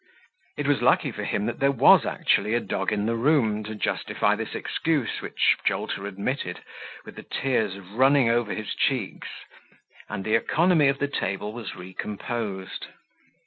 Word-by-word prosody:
It 145 - -2
was 145 0 +2
lucky - - +3
for - - -6
him 100 - -1
that 120 +1 -3
there 140 +1 +3
was 135 - +6
actually 105 +3 +1
a - - +3
dog 95 -4 -2
in 105 0 0
the 115 +1 0
room, 115 -5 +2
to 110 0 -6
justify - - 0
this - - -5
excuse, 155 -7 -1
which - - +2
Jolter 100 - -1
admitted 100 +7 -3 0.5
with - - -12
the - - -6
tears 110 -7 -1
running 125 +8 +3
over 115 -2 +1
his 110 -1 -4
cheeks, 125 -8 -1 0.8
and 100 -2 -4
the 110 - 0
economy 160 +6 +3
of 135 0 +2
the 145 - 0
table 105 -5 -3
was 115 -4 -7
recomposed. 95 +2 -5
115 Hz, 160 wpm, -25 LUFS, 100-135 Hz, 0.8 s, was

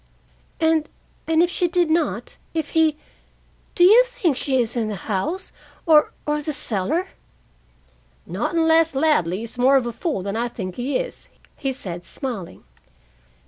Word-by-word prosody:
"And 320 -1 +2 0.4
and 325 +1 +4
if 350 - 0
she 355 - +1
did 345 -2 +1
not, 330 +1 -1 0.2
if 315 -3 -1
he 320 -2 +3 0.8
do 350 - +4
you 435 +7 +8
think 360 - 0
she 265 0 0
is 235 -1 0
in 230 -3 0
the 215 - -3
house 220 - -2 0.3
or 310 -3 +5
or 300 0 0
the 305 +1 -3
cellar?" 275 - -1 1.2
"Not 195 - -3
unless 325 -1 +3
Ladley 225 - +1
is 230 +2 -8
more 265 +2 +5
of 255 - 0
a 240 - -3
fool 290 - -2
than 200 +1 -3
I 235 +2 0
think 190 -6 -6
he 255 +3 0
is," - - -6 0.3
he 270 -2 -2
said, 180 -9 -6
smiling. 230 - -6
295 Hz, 160 wpm, -22 LUFS, 230-325 Hz, 1.2 s, you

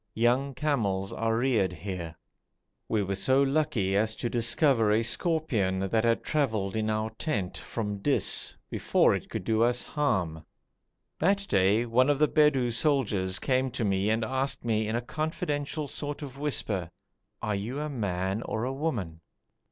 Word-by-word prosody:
Young 125 +4 +1
camels 105 -11 -1
are 115 0 0
reared 115 -7 +2
here. 90 -3 -6 0.7
We 110 -2 +1
were 100 0 -2
so 130 +8 +3
lucky 135 -9 +1
as 110 +2 +2
to 120 - -3
discover 120 0 +3
a 110 +2 +3
scorpion 120 - 0
that 95 +4 0
had 115 -1 +2
travelled 110 -10 0
in 110 0 0
our 110 0 -1
tent 105 - -3
from 105 -3 -4
Dis, - - +1 0.2
before - - +3
it - - -4
could - - -4
do 110 +3 +1
us 120 +1 +2
harm. 90 - -1 0.8
That 200 +4 +2
day 100 +4 +3
one 125 +4 +3
of 145 - +3
the 150 +1 +4
Bedou 140 -6 +3
soldiers 110 -9 +1
came 130 0 +1
to 120 -2 -2
me 100 +1 +1
and 110 +1 +1
asked 130 +1 -1
me 110 -2 +1
in 110 - -1
a 120 - 0
confidential 150 -1 -3
sort 145 +2 -5
of 135 -1 -9
whisper, 105 - -1 0.5
'Are 105 - 0
you 110 +8 -3
a 150 - -2
man 100 -6 -2
or 110 -1 -3
a 130 +2 -2
woman?' 115 - -3
115 Hz, 165 wpm, -28 LUFS, 100-140 Hz, 0.8 s, the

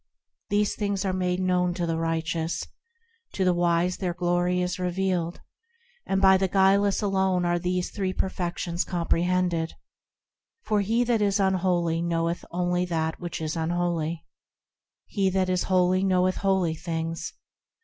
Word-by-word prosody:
These 205 0 +1
things 200 -2 -2
are 190 - 0
made 180 -1 0
known 180 -1 +1
to 175 - -1
the 165 -1 -1
righteous, 165 0 -2 0.7
To 190 - 0
the 180 - +4
wise 175 +1 +1
their 180 -3 -2
glory 175 0 +1
is 180 +1 -2
revealed, 180 -1 -1 0.7
And 195 - +1
by 190 -1 +6
the 190 0 +1
guileless 195 +2 +3
alone 190 -2 +1
are 175 0 +1
these 180 +1 -1
three 190 -2 -2
Perfections 175 -2 -2
comprehended; 175 -1 0 0.9
For 210 -1 +1
he 225 +5 +1
that 235 -2 +1
is 200 0 +2
unholy 180 -3 +1
knoweth 170 0 -1
only 180 0 0
that 160 -2 -2
which 175 -1 -5
is 155 0 -3
unholy; 170 -1 -1 0.8
He 195 -2 0
that 185 0 0
is 185 -1 0
holy 185 0 +2
knoweth 185 -1 +2
holy 190 -4 +1
things. 165 0 -4
180 Hz, 145 wpm, -26 LUFS, 170-190 Hz, 0.9 s, by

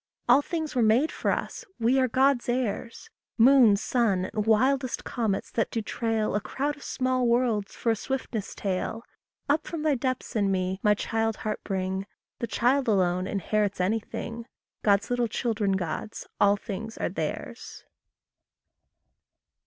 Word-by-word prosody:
All 250 +3 +6
things 315 0 -3
were 250 - +1
made 230 +8 +3
for - - -2
us - - -2 0.2
we 240 +4 +3
are 260 - +3
God's 260 0 +2
heirs 240 - -3 0.3
Moon, 240 -3 +7
sun, 200 -5 0
and 210 0 -1
wildest 255 +3 +2
comets 220 -5 -2
that 230 - 0
do 230 - -2
trail 225 0 -1
A 205 - 0
crowd 290 +6 -2
of 290 - -17
small 255 -1 0
worlds 235 -4 +1
for 230 - 0
a - - +2
swiftness 230 -3 -4
tail! 200 +4 -3 0.4
Up 300 +2 +1
from 325 -3 -4
Thy 310 -2 +3
depths 255 -1 -2
in 205 -2 +2
me, 185 0 -1
my 210 0 +4
child 225 +1 -1
heart 215 -1 -2
bring 190 0 -2 0.3
The 235 - -2
child 260 +4 +2
alone 185 -3 +2
inherits 205 0 -1
anything: 225 +4 -2 0.3
God's 200 +2 +2
little 245 -1 +1
children 220 -3 0
gods 190 +3 -4
all 205 0 +5
things 220 +2 -6
are - - -1
theirs! - - -5
225 Hz, 155 wpm, -27 LUFS, 205-255 Hz, 0.4 s, Moon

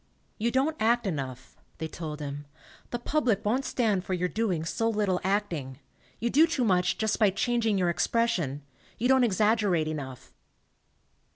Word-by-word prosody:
"You 230 +2 +1
don't 270 +6 +1
act 235 +2 +2
enough," 130 -7 -5 0.2
they 160 - -3
told 155 -2 -6
him. 145 0 -6 0.4
"The 240 - -2
public 240 -5 0
won't 255 +6 +1
stand 215 -7 0
for 190 - -2
your 180 0 0
doing 185 -8 -1
so 225 +7 0
little 205 -4 0
acting. 175 -10 -1 0.4
You 235 +1 -1
do 310 +5 +6
too 320 -6 0
much 180 -4 +2
just 220 -1 0
by 210 -3 +5
changing 225 +1 0
your 180 -2 +2
expression; 170 - 0 0.3
you 240 - +1
don't 265 -1 +5
ex 210 -6 +1
aggerate 210 -7 +3
enough." 135 -5 -6
205 Hz, 165 wpm, -28 LUFS, 165-235 Hz, 0.4 s, do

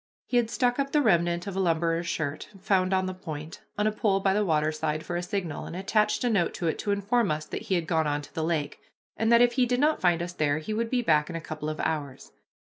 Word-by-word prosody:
He 245 - 0
had 235 -2 +2
stuck 245 +2 +1
up 275 0 -1
the 300 - +4
remnant 175 -4 +2
of 200 -2 -5
a - - -1
lumberer's 165 -1 +1
shirt, 155 -1 -3
found 185 -1 +1
on 190 0 +2
the 185 - -3
point, 160 -4 -8 0.2
on 210 - +1
a 215 - +3
pole 205 -2 +1
by 195 0 +2
the 210 +1 +2
waterside 155 -2 0
for 175 - -4
a 175 - -1
signal, 180 -4 -4
and - - -7
attached 210 +5 +1
a 245 - +2
note 190 -6 +1
to 175 - -4
it 160 - 0
to - - -4
inform 200 +3 +1
us 155 0 -2
that - - -5
he 190 - +3
had 170 -2 0
gone 160 -2 +1
on 145 0 -1
to - - -14
the 160 - -2
lake, 155 -3 -2 0.4
and 225 +1 +1
that 235 +1 +7
if 245 - +4
he 250 0 +2
did 245 +1 0
not 305 +2 +2
find 175 -2 +2
us 175 +1 -6
there 145 -4 +1
he 155 +7 -4
would 225 +1 -1
be 245 -1 0
back 150 -4 +3
in 170 - -5
a - - -2
couple 155 -1 -5
of 155 - -5
hours. 145 -4 -3
175 Hz, 270 wpm, -27 LUFS, 155-215 Hz, 0.4 s, that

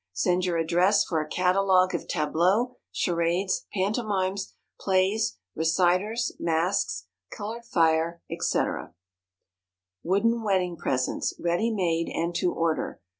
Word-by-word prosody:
Send 180 - +1
your 175 -2 0
address 175 +5 +3
for 160 -3 -1
a 155 - -6
Catalogue 185 0 +3
of - - -3
Tableaux, 180 +10 +1 0.2
Charades, 175 +2 0
Pantomimes, 200 -1 -1 0.2
Plays, 190 - +1 0.2
Reciters, 185 +8 +1
Masks, 165 - 0 0.2
Colored 225 +3 -6
Fire, 165 -3 +2
&c., - - -4
&c. - - +1 1.4
WOODEN 225 +6 +1
WEDDING 185 -5 0
PRESENTS 130 -4 -1
Ready 175 +7 +1
made 170 -6 0
and 170 +1 -2
to 175 +1 +1
order. 165 -1 -1
180 Hz, 115 wpm, -26 LUFS, 165-200 Hz, 1.4 s, address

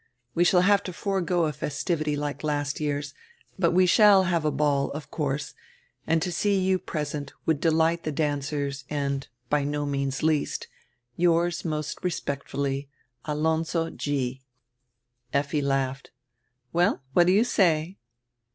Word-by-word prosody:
We 175 - +3
shall 180 0 +5
have 200 +2 +4
to 185 - -5
forego 180 -3 0
a 155 - -1
festivity 150 +1 -2
like 145 +1 -4
last 145 -1 -1
year's, 145 -1 -2 0.5
but 170 -3 +4
we 185 +2 +4
shall 200 +1 +6
have 175 -3 +1
a 155 - +2
ball, 145 -2 +1
of 150 -1 -8
course, 145 -2 -2 0.5
and 160 0 +2
to 180 - -2
see 200 +3 +1
you 185 0 +2
present 150 -4 -4
would 160 -3 +2
delight 165 +1 +2
tire 155 - -2
dancers 145 -1 -2
and, 140 -2 -2 0.2
by 145 -1 +3
no 145 +1 -1
means 140 -1 -2
least, 155 -2 0 0.5
Yours 170 0 +2
nrost 155 -1 -4
respectfully, 140 -4 -2 0.4
Alonzo 160 +2 0
G" 135 -3 -2 0.9
Effi 145 +1 +1
laughed. 135 -1 -1 0.6
"Well, 175 -4 +2
what 175 +2 +5
do 180 - +5
you 210 +3 +5
say?" 180 -6 +1
155 Hz, 140 wpm, -26 LUFS, 145-175 Hz, 0.9 s, shall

